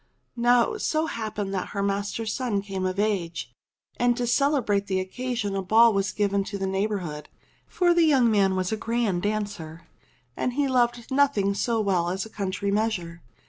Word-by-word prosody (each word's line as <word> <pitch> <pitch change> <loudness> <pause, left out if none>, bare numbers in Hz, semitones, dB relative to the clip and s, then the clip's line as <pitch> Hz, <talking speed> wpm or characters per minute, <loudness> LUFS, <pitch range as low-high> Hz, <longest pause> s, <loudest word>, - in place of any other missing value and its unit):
Now 240 - +3
it 430 - -6
so 310 0 0
happened 215 -7 -4
that 185 -2 -2
her 200 - +1
master's 205 +2 -2
son 230 -7 -1
came 190 -2 -3
of 185 +1 -3
age, 185 - -1 0.5
and 240 0 +2
to 245 - -1
celebrate 240 -6 +1
the 190 -1 0
occasion 220 +1 -3
a 195 - -1
ball 225 +4 +5
was 195 -1 0
given 200 -1 0
to 200 - -5
the 195 - -2
neigh 190 +2 0
bourhood, 170 -8 -5 0.4
for 350 -1 +2
the 345 - +3
young 270 -8 +4
man 195 -3 +3
was 185 -1 -1
a 220 - -1
grand 230 -5 -1
dancer, 200 -6 -4 0.5
and 250 +1 -2
loved 245 -3 +1
nothing 265 -8 +2
so 225 +3 0
well 180 -4 +1
as 190 +3 -2
a 220 - -12
country 200 0 -2
measure. 195 -6 -1
205 Hz, 180 wpm, -25 LUFS, 195-240 Hz, 0.5 s, ball